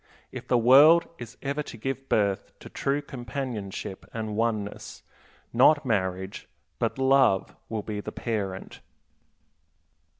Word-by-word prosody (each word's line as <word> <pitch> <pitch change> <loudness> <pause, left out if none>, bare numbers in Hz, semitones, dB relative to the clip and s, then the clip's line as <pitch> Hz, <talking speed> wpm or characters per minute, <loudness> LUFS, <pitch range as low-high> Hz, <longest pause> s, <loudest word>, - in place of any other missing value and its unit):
If - - -8
the 125 - +3
world 145 +8 +7
is 120 -1 -9
ever 140 +2 -1
to 130 - -9
give 135 +3 -5
birth 100 -2 0
to - - -11
true 140 +1 -1
companionship 115 -6 -6
and 110 -2 -4
oneness, 110 -2 -3 0.5
not 145 +5 +5
marriage, 95 -3 -2 0.3
but - - -1
love 130 -7 +3
will 110 -2 -3
be 105 0 -4
the - - -6
parent. 100 -5 -4
115 Hz, 125 wpm, -26 LUFS, 105-135 Hz, 0.5 s, world